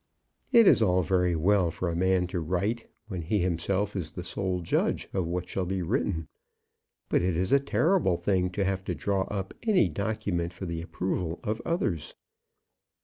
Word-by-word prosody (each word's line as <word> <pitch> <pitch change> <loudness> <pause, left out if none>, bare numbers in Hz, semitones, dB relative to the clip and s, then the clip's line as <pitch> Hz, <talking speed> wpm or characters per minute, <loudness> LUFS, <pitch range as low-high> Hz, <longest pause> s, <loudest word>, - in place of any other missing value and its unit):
It 230 -1 +7
is - - +6
all 90 -3 +3
very 90 -1 +2
well 90 +2 +3
for 90 +2 -3
a 85 - -1
man 95 +1 +2
to 90 - 0
write, 95 +8 -1 0.2
when 95 -5 -4
he 90 +7 0
himself 95 +4 0
is 85 -6 -2
the 90 - -7
sole 95 0 -2
judge 85 - 0
of 90 -3 0
what 90 +1 -3
shall 95 -2 -2
be 95 -1 -1
written; 85 - -1 0.8
but - - +2
it 90 -1 0
is 90 +2 0
a 140 - +6
terrible 140 - +2
thing 90 -1 +1
to 100 +1 0
have 95 0 -1
to 90 - -2
draw 95 +4 0
up 95 -2 -4
any 215 -6 +3
document 95 -4 -2
for 95 - -7
the 85 -1 -3
approval 90 -1 -3
of 110 +2 -2
others. 95 - -1
95 Hz, 185 wpm, -28 LUFS, 85-100 Hz, 0.8 s, It